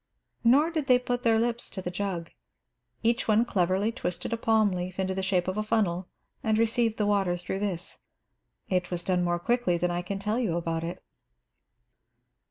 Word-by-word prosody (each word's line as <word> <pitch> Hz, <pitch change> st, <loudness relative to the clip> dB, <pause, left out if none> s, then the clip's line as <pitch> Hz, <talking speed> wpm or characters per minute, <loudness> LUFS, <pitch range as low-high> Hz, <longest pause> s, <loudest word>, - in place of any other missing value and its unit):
Nor 280 Hz, +8 st, +5 dB
did 310 Hz, -4 st, -2 dB
they 250 Hz, -2 st, +6 dB
put 245 Hz, -1 st, -2 dB
their 230 Hz, -2 st, +3 dB
lips 235 Hz, +1 st, 0 dB
to -, -, -7 dB
the 180 Hz, -1 st, -4 dB
jug. 180 Hz, -3 st, -3 dB, 0.7 s
Each 235 Hz, +1 st, +1 dB
one 220 Hz, +2 st, +4 dB
cleverly 190 Hz, +1 st, +1 dB
twisted 180 Hz, +1 st, -4 dB
a -, -, +3 dB
palm 220 Hz, -2 st, +3 dB
leaf 180 Hz, 0 st, -4 dB
into 190 Hz, 0 st, 0 dB
the 190 Hz, -, -2 dB
shape 190 Hz, -2 st, +1 dB
of 185 Hz, +2 st, -2 dB
a -, -, +1 dB
funnel 190 Hz, -5 st, 0 dB, 0.3 s
and 220 Hz, -1 st, +1 dB
received 230 Hz, 0 st, +2 dB
the 210 Hz, -, +1 dB
water 195 Hz, -4 st, +2 dB
through 175 Hz, +2 st, -4 dB
this. 185 Hz, -4 st, -4 dB, 0.7 s
It 180 Hz, -2 st, 0 dB
was 175 Hz, -1 st, -3 dB
done 180 Hz, -2 st, +1 dB
more 175 Hz, 0 st, +1 dB
quickly 230 Hz, -2 st, +1 dB
than 175 Hz, +1 st, 0 dB
I 175 Hz, 0 st, -1 dB
can 195 Hz, +3 st, -4 dB
tell 210 Hz, +4 st, -1 dB
you 190 Hz, -9 st, 0 dB
about 165 Hz, -1 st, -2 dB
it. 170 Hz, +1 st, -5 dB
195 Hz, 190 wpm, -28 LUFS, 180-225 Hz, 0.7 s, they